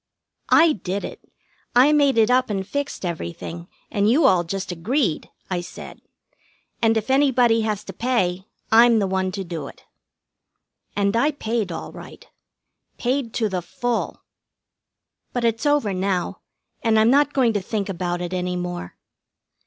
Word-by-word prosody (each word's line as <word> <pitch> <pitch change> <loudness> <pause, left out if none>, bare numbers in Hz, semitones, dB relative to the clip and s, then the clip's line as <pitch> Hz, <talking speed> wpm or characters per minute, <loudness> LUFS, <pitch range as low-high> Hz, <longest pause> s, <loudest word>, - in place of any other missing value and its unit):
"I 325 -1 +6
did 195 -1 -4
it. - - -9 0.5
I 265 +5 +6
made 285 -4 +3
it 225 +1 +4
up 255 0 +3
and 195 -2 -2
fixed 285 -7 -3
everything, 170 - -5 0.2
and 205 +1 +2
you 280 +6 +4
all 185 -9 +5
just 185 +2 -4
agreed," 190 - -1 0.2
I 180 -2 -2
said. 175 - -10 0.8
"And 225 -1 +3
if 220 +4 -2
anybody 250 -4 +4
has 215 -2 -2
to 195 - -8
pay, 190 -5 -1 0.2
I'm 230 +1 +7
the 205 - +2
one 190 0 -1
to 195 - -3
do 170 -4 -6
it." - - -14 1.1
And 200 +1 +1
I 275 +6 +3
paid 230 -5 -2
all - - -6
right. - - -12 0.7
Paid 250 -1 -1
to 225 - +1
the 185 -3 -2
full. 240 +7 -3 1.1
But 245 -1 -1
it's 230 +5 +1
over 290 -9 +2
now, 185 -1 -1 0.4
and 225 -1 +2
I'm 220 +2 +5
not 290 +1 +4
going 250 -5 +2
to 205 - 0
think 200 +1 -3
about 175 -2 -3
it 175 +1 -4
any 180 0 -2
more. 175 - -5
215 Hz, 160 wpm, -22 LUFS, 185-245 Hz, 1.1 s, I'm